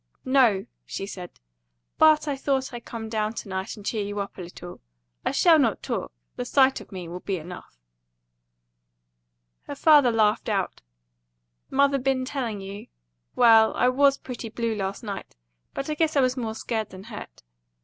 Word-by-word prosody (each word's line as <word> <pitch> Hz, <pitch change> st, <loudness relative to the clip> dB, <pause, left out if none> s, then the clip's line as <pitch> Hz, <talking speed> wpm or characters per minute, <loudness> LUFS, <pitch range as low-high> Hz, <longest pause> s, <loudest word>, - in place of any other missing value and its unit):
"No," 245 Hz, -7 st, +4 dB, 0.2 s
she 195 Hz, -, -5 dB
said; 180 Hz, -3 st, -9 dB, 0.6 s
"but 310 Hz, -1 st, +5 dB
I 285 Hz, -, 0 dB
thought 265 Hz, -1 st, -1 dB
I'd 240 Hz, -1 st, -8 dB
come 225 Hz, -1 st, -6 dB
down 215 Hz, -1 st, -1 dB
to 220 Hz, -, -7 dB
night 190 Hz, 0 st, -4 dB
and 205 Hz, -, -12 dB
cheer 215 Hz, -2 st, -1 dB
you 205 Hz, 0 st, -4 dB
up 200 Hz, 0 st, -5 dB
a -, -, -8 dB
little. 175 Hz, 0 st, -10 dB, 0.4 s
I -, -, +1 dB
shall 330 Hz, -3 st, +5 dB
not 275 Hz, -, +1 dB
talk; -, -, -3 dB, 0.3 s
the 245 Hz, -, -2 dB
sight 265 Hz, +1 st, +3 dB
of -, -, -15 dB
me 185 Hz, -3 st, -6 dB
will 175 Hz, +2 st, -6 dB
be 190 Hz, 0 st, -3 dB
enough." 170 Hz, -, -10 dB, 1.9 s
Her -, -, -5 dB
father 295 Hz, -5 st, +6 dB
laughed 220 Hz, 0 st, +2 dB
out. 195 Hz, -3 st, -1 dB, 0.9 s
"Mother 280 Hz, 0 st, +3 dB
been 260 Hz, 0 st, 0 dB
telling 240 Hz, -7 st, -3 dB
you? 195 Hz, +1 st, -8 dB, 0.5 s
Well, 225 Hz, -2 st, +6 dB
I 250 Hz, -, +3 dB
WAS 275 Hz, +2 st, +4 dB
pretty 240 Hz, -3 st, -7 dB
blue 230 Hz, 0 st, -2 dB
last 200 Hz, +1 st, -4 dB
night; 200 Hz, -3 st, -6 dB, 0.4 s
but 275 Hz, -, -3 dB
I 305 Hz, -, -1 dB
guess 315 Hz, 0 st, 0 dB
I 280 Hz, -, +5 dB
was 255 Hz, 0 st, +2 dB
more 225 Hz, -4 st, -3 dB
scared 220 Hz, -1 st, -3 dB
than 185 Hz, 0 st, -11 dB
hurt. 215 Hz, -, -10 dB
225 Hz, 175 wpm, -25 LUFS, 200-265 Hz, 1.9 s, father